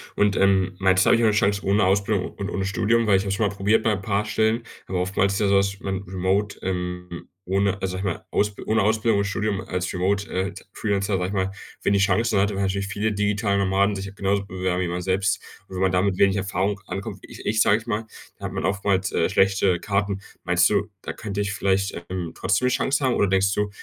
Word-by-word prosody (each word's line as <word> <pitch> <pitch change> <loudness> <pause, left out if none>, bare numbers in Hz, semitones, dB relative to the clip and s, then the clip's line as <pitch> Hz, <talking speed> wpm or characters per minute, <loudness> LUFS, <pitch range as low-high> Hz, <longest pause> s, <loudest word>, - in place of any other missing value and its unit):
Und, 105 -1 +2
ähm, 95 -1 +2
meinst 95 -1 +4
habe - - +6
ich 115 - +1
'ne 110 -2 +4
Chance 100 -1 +1
ohne 100 +2 +3
Ausbildung 100 0 +1
und 100 0 -4
ohne 95 -2 -2
Studium, 115 +2 +1
weil 100 - +5
ich 95 - -1
habe 100 - -4
es - - +1
schon 105 +1 +1
mal 100 - -5
probiert 105 +3 +2
bei 110 - +2
'n 100 -2 -2
paar 100 +1 0
Stellen, 110 +2 +1 0.2
aber 95 - -2
oftmals 95 +1 +1
ist 100 - -1
ja 105 - +2
so, 100 - +3
dass 100 0 0
man 95 0 -3
Remote, 95 +2 -1
ähm, 90 -1 -4 0.2
ohne, 100 +1 0
also 95 -1 -2
sage - - -4
ich 90 - +1
mal, - - -14
Ausb 105 0 0
ohne 110 -1 +2
Ausbildung 110 0 +2
und 100 - +1
Studium 100 0 -1
als 90 -1 -3
Remote, 100 +3 0
äh, 95 +1 -2 0.2
Freelancer, 100 -1 -1
sage 90 0 -1
ich 95 - -5
mal, 95 -1 0 0.3
wenig 100 -1 +2
Chancen 105 +2 +2
hat, 100 +1 +1
weil 100 - -2
natürlich 95 0 -1
viele 105 +2 -1
digitale 105 0 0
Nomaden 100 +1 +2
sich 95 0 -6
genauso 100 0 0
bewerben, 95 -1 -2
wie 90 - -1
man 90 +1 -3
selbst. 95 +1 0 0.3
Und 95 - -10
wenn 90 - -3
man 95 - +3
da 90 - +3
mit 100 -1 0
wenig 100 0 +4
Erfahrung 95 0 -1
ankommt, 95 - -5
wie - - -11
i - - -10
ich 110 +1 +2
sage 105 - +5
ich 115 +2 -10
mal, 110 0 -2 0.3
da 100 - -8
hat 95 - -4
man 95 - -2
oftmals, 100 0 0
äh, 80 - +2
schlechte 95 -2 +2
Karten. 100 -1 -1 0.2
Meinst 90 0 +3
du, 105 0 0
da - - -5
könnte 105 -2 -5
ich 100 -1 -2
vielleicht, 100 -1 0 0.2
ähm, 90 -3 -4
trotzdem 95 +6 +1
'ne - - +3
Chance 140 +3 0
haben, 130 - +2
oder 100 - +2
denkst 95 +1 +2
du, 105 0 0
100 Hz, 245 wpm, -24 LUFS, 95-105 Hz, 0.3 s, habe